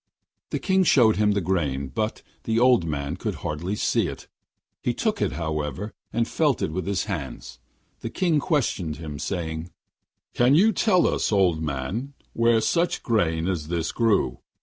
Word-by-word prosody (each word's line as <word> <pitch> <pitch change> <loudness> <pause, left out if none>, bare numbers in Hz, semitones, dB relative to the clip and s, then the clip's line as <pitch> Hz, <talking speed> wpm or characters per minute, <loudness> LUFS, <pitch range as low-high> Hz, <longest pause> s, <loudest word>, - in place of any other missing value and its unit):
The - - -1
King 190 -1 +2
showed 120 -10 +5
him 105 0 +3
the 100 - 0
grain, 75 -7 -1
but 110 - -3 0.2
the 115 0 0
old 125 -7 +4
man 70 -2 -3
could - - -3
hardly 85 +7 -2
see - - +1
it; - - -8 0.5
he - - -1
took - - -1
it, - - 0
however, 80 +4 -3 0.2
and 115 0 0
felt 150 -7 +1
it - - -1
with 90 +2 -3
his 100 -2 0
hands. 75 - -6 0.4
The 115 - -5
King 170 +1 +1
questioned 125 - 0
him, 75 -2 -7
saying: 80 -1 -3 0.6
'Can 125 +3 +4
you 210 +7 +5
tell 185 -5 +3
us, - - +1
old 90 -6 +3
man, 80 - -3 0.2
where 115 -1 +3
such 170 +8 0
grain 85 -8 +1
as 85 -5 -2
this 85 -1 -1
grew? 115 -4 +1
95 Hz, 170 wpm, -25 LUFS, 80-120 Hz, 0.6 s, showed